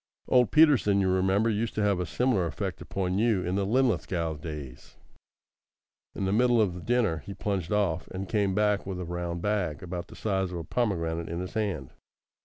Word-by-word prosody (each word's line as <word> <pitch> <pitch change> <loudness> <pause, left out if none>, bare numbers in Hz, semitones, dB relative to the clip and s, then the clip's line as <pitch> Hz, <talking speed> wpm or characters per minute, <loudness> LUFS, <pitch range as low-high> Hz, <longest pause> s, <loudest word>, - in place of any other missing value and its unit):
Old 125 -2 +4
Peterson, 145 -11 +5
you 95 - +2
remember, 95 +4 +2
used 110 +1 -1
to 105 - 0
have 100 -3 +2
a 90 - -2
similar 100 - +1
effect 80 - -4
upon 95 0 -2
you 110 -5 +2
in 90 - -2
the 100 0 0
Linlithgow 95 -9 +1
days. 75 -4 -8 1.2
In 95 - -2
the 95 - 0
middle 120 +1 +4
of 90 -5 0
dinner 115 -9 +2
he 100 +6 -9
plunged 95 -5 -2
off, 95 -5 0
and 95 +1 -6
came 100 -3 +1
back 105 -1 +1
with 95 -2 -4
a 90 - -4
round 85 0 -4
bag 100 -8 -1
about 90 -1 -5
the - - -13
size 95 -3 -1
of 90 - -4
a 85 - -4
pomegranate 85 -5 -1
in 85 +1 -3
his 90 0 -5
hand. 100 -12 -2
95 Hz, 195 wpm, -28 LUFS, 85-105 Hz, 1.2 s, Peterson